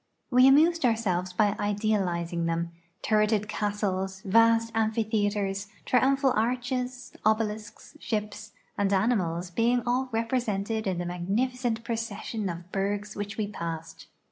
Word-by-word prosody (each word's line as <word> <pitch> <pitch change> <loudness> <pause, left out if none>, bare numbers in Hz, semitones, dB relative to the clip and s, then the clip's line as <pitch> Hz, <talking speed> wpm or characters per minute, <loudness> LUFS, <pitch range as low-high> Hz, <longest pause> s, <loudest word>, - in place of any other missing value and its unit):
We 255 +1 +7
amused 320 +4 +5
ourselves 195 -7 +1
b}^ 205 +3 +1
idealizing 190 -5 0
them, 170 0 -1 0.3
turreted 215 -1 +2
castles, 195 -3 -2
vast 230 +2 +4
amphitheaters, 210 -3 0 0.2
triumphal 270 +1 +3
arches, 250 +2 -2
obelisks, 215 +2 -1
ships, 210 -2 -4 0.3
and 200 -1 +2
animals 185 -4 +1
being 235 +5 +2
all 255 +2 0
represented 225 -2 -1
in 185 -2 0
the 175 - -3
magnificent 225 +7 -1
procession 225 -3 -3
of 175 +1 -7
bergs 200 +1 -2
which 205 +1 -5
we 215 - 0
passed. 165 -4 -6
210 Hz, 115 wpm, -27 LUFS, 195-230 Hz, 0.3 s, We